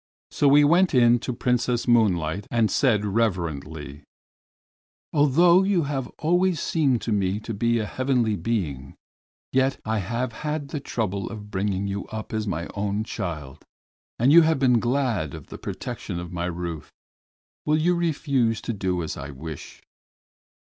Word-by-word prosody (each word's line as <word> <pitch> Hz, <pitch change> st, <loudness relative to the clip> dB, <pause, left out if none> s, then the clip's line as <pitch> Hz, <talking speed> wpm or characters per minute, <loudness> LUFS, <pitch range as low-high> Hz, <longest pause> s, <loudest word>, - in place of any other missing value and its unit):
So 140 Hz, -1 st, +3 dB
he 145 Hz, -, +7 dB
went 170 Hz, +3 st, +4 dB
in 120 Hz, -1 st, +5 dB
to 125 Hz, -, -4 dB
Princess 125 Hz, 0 st, 0 dB
Moonlight 100 Hz, -6 st, +2 dB
and 115 Hz, -2 st, +1 dB
said 110 Hz, -7 st, +2 dB
reverently: 80 Hz, -9 st, -2 dB, 1.1 s
"Although 170 Hz, +5 st, +5 dB
you 190 Hz, -3 st, +2 dB
have 135 Hz, -3 st, -3 dB
always 175 Hz, +1 st, +2 dB
seemed 140 Hz, -8 st, +1 dB
to 115 Hz, -, -2 dB
me 100 Hz, -1 st, 0 dB
to 115 Hz, -, -5 dB
be 115 Hz, +3 st, +1 dB
a 110 Hz, -, -1 dB
heavenly 125 Hz, -2 st, 0 dB
being, 80 Hz, -, -3 dB, 0.6 s
yet 130 Hz, +1 st, +2 dB
I 110 Hz, 0 st, 0 dB
have 115 Hz, +5 st, -3 dB
had 150 Hz, -1 st, -3 dB
the 150 Hz, -, -3 dB
trouble 100 Hz, -7 st, -3 dB
of 105 Hz, -2 st, -9 dB
bringing 100 Hz, 0 st, -1 dB
you 100 Hz, 0 st, -4 dB
up 110 Hz, 0 st, -7 dB
as 110 Hz, -1 st, -2 dB
my 85 Hz, -2 st, -3 dB
own 100 Hz, +1 st, -1 dB
child 80 Hz, -, -6 dB, 0.5 s
and 130 Hz, +5 st, +4 dB
you 170 Hz, -, +9 dB
have 160 Hz, -1 st, +3 dB
been 125 Hz, -3 st, +3 dB
glad 120 Hz, -, -1 dB
of -, -, -11 dB
the -, -, -9 dB
protection 85 Hz, -, -5 dB
of 90 Hz, 0 st, -7 dB
my 85 Hz, 0 st, -2 dB
roof. 85 Hz, -3 st, -5 dB, 0.8 s
Will 150 Hz, +1 st, +3 dB
you 170 Hz, +3 st, +2 dB
refuse 140 Hz, -9 st, 0 dB
to 115 Hz, -, -3 dB
do 90 Hz, -4 st, -1 dB
as 80 Hz, -, -4 dB
I 70 Hz, +1 st, -7 dB
wish?" 75 Hz, +2 st, -9 dB
115 Hz, 160 wpm, -24 LUFS, 95-135 Hz, 1.1 s, you